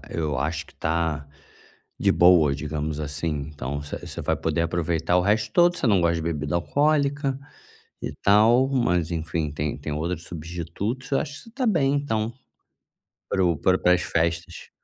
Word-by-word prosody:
eu 75 -5 -2
acho 80 +2 -2
que - - -19
tá 80 -3 -1 0.7
de - - +3
boa 85 -5 +5
digamos 75 +1 -3
assim, 75 0 -2
então 70 0 -4
você 75 - -6
você - - -7
vai - - 0
poder 85 - -1
aproveitar 85 0 0
o - - +4
resto 105 +2 +1
todo, 175 +4 +4
você 130 - 0
não 100 -4 +4
gosta 85 0 +2
de 80 - -3
bebida 75 -1 -2
alcoólica 140 - +1 0.6
e - - -3
tal, 115 +6 +5
mas 90 - +1
enfim 80 -2 -2
tem 75 0 -2
tem 75 - -5
outro 80 +3 -2
substitutos, 85 - -5
eu 135 - +2
acho 145 - -4
que - - -9
você 230 - -15
está 255 +2 -2
bem 145 -10 +2
então, 115 -6 -1 1.0
para 95 - +1
o 85 -2 +2
para 90 +4 +3
o - - -10
para 90 - +4
as 90 - 0
festas. 85 0 -2
85 Hz, 180 wpm, -24 LUFS, 80-110 Hz, 1.0 s, boa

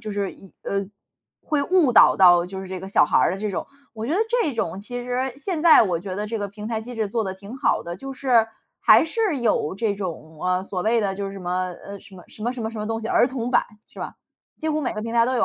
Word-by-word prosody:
就 215 - -6
是， 200 -1 -2
一 195 - -17
呃， 200 -1 -2 0.6
会 295 -2 0
误 335 -5 +3
导 - - +7
到 175 -2 +6
就 190 +1 -7
是 - - -8
这 185 -1 -5
个 190 - -7
小 195 - +4
孩 - - +2
儿 - - +3
的 - - -7
这 210 +1 -2
种。 190 - -4 0.3
我 225 0 -5
觉 300 - -1
得 385 - +1
这 470 - +1
种 190 -3 -2
其 245 +3 -6
实 250 +1 -2
现 315 +2 -3
在 330 -6 +8
我 175 -5 0
觉 185 0 -6
得 210 +1 -3
这 225 +1 -3
个 205 -1 -3
平 210 +1 -9
台 220 -1 -2
机 245 +2 -8
制 220 -2 -1
做 225 +2 -1
得 190 -2 -4
挺 200 +4 -10
好 - - +1
的， 170 0 -6
就 270 +6 -7
是 245 -5 +3 0.3
还 - - +6
是 365 -1 0
有 225 -8 0
这 210 -1 0
种， 160 -5 -7
呃， 180 0 +1
所 185 -2 -4
谓 230 +1 +2
的 195 -2 -1
就 200 0 -4
是 195 - -8
什 - - -7
么， 180 0 -2
呃， 200 0 -8
什 195 - -16
么 180 - -13
什 210 - -13
么 240 +2 0
什 240 - -5
么 220 - -2
什 225 - -8
么 210 - -3
东 225 0 -2
西 220 - -3
儿 245 - +3
童 250 -2 -3
版， - - +4 0.2
是 - - -13
吧？ - - -5 0.4
几 315 - -3
乎 305 0 0
每 255 - -1
个 215 - -4
平 230 +1 -5
台 230 0 +4
都 255 - 0
有 230 - +3
215 Hz, 310 characters per minute, -23 LUFS, 190-245 Hz, 0.6 s, 在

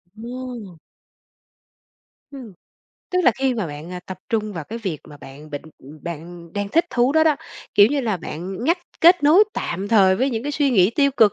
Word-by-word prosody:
Wow. 235 -5 -8 1.5
Ừm. 255 -7 -10 0.6
Tức 365 - +1
là - - +7
khi 265 -1 +1
mà 215 -6 -2
bạn, 150 +3 -8
a, 180 - -6
tập 180 0 -9
trung 215 -2 -1
vào 165 -5 -6
cái 225 +7 -6
việc 190 -9 -4
mà 150 - -12
bạn 145 +2 -13
bệnh 145 -1 -5 0.2
ừm, 145 +4 -13
bạn 170 0 -8
đang 205 -1 -3
thích 330 +11 +3
thú 245 +2 +2
đó 315 +1 +4
đó, 310 -2 +3 0.4
kiểu 205 - +8
như 280 +4 0
là, 220 -6 -1
bạn 180 +6 -6
ngắt 340 +6 +2 0.2
kết 345 +1 +6
nối 320 +8 +6
tạm 190 +4 -3
thời 195 -4 +5
với 265 +5 +1
những 225 -2 -3
cái 290 +2 -3
suy 285 -1 +1
nghĩ 195 -5 +4
tiêu 280 -1 +3
cực 215 -4 +5
215 Hz, 205 wpm, -22 LUFS, 175-265 Hz, 1.5 s, kiểu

